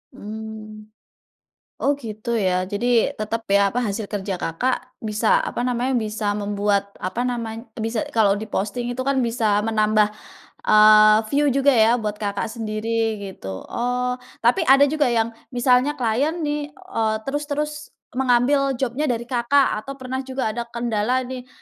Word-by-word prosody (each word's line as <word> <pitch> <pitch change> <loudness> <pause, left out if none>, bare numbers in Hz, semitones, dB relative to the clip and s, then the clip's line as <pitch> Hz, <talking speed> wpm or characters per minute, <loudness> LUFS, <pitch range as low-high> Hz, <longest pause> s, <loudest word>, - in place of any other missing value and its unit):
Mmm. 215 0 -8 0.9
Oh 285 +1 +2
gitu 230 -3 -5
ya, 185 -3 +1
jadi, 235 +4 +1
tetap 225 +1 -4
ya, 200 0 +3
apa 245 - -1
hasil 215 -3 -3
kerja 195 -2 -2
Kakak, 255 +10 -3
bisa 220 - +2
apa - - -3
namanya, 250 +1 0
bisa 215 -2 -1
membuat, 205 -1 0
apa 185 +7 -2
namanya, 230 -2 -3 0.2
bisa 225 0 -1
kalau 205 -3 +3
di 205 - -5
posting 240 +5 -2
itu 245 - -7
kan 265 -1 +1
bisa 220 -3 +1
menambah, 215 -1 +2 0.6
eee, 215 0 +7
view 290 +1 +3
juga 275 +1 +4
ya 230 -1 +5
buat 210 -3 -3
Kakak 205 +1 -2
sendiri, 225 0 -2 0.2
gitu. 95 - -7
Oh, 250 +1 -1 0.2
tapi 240 +1 +3
ada 275 +1 +7
juga 305 -3 +2
yang, 230 -1 +1 0.2
misalnya 250 +3 +3
klien 255 +7 0
nih, 295 0 -2
eee, 225 - -2
terus 290 +2 -3
terus 300 +1 -1 0.4
mengambil 265 +2 +2
job-nya 265 +4 -1
dari 235 -2 -1
Kakak, 245 0 +2
atau 275 +6 -8
pernah 260 -1 -5
juga 260 -3 -2
ada 235 +2 -5
kendala 235 +1 -1
nih, 255 0 -7
230 Hz, 155 wpm, -22 LUFS, 215-255 Hz, 0.9 s, eee